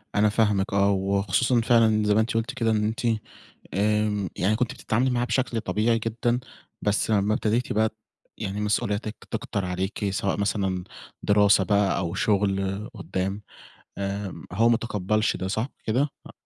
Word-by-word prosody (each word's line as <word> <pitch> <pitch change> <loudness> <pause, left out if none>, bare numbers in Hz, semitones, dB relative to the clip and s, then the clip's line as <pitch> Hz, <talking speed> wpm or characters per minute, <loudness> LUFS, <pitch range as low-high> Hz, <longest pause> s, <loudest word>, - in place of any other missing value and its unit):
أنا 105 +1 +4
فاهمِك 105 -3 +1
آه، 100 0 +4
وخصوصًا 100 +5 +1
فعلًا 110 -2 +4
زي 105 0 +3
ما 110 - +4
أنتِ 110 - -1
قُلتِ 115 +4 -1
كده 115 -3 0
إن 105 -1 +1
أنتِ 110 +2 -2 0.7
آمم، 105 -1 +1
يعني 105 +4 +2
كنت 125 +1 -1
بتتعاملي 125 +3 0
معاه 120 0 +1
بشكل 120 -1 0
طبيعي 110 +5 +1
جدًا، 120 +2 -1 0.4
بس 105 +2 +1
أمّا 105 0 +2
ابتديتِ 115 +4 0
بقى 110 +1 +2
ت - - -19 0.5
يعني 105 -1 -3
مسؤولياتِك 105 +1 -1
تكتر 100 - -3
عليكِ 95 +3 -2
سواء 95 0 -1
مثلًا 95 -3 -1 0.4
دراسة 100 -1 +4
بقى 100 -2 +2
أو 85 -2 -2
شُغل 100 +1 0
قُدّام، 95 +1 -3 0.6
آمم 100 -4 -4
هو 115 +5 +3
متقبَّلش 110 -2 0
ده، 95 - -3
صح 110 +7 -1 0.2
كده؟ 130 +7 +2 0.2
أ - - -12
105 Hz, 155 wpm, -25 LUFS, 100-110 Hz, 0.7 s, أنا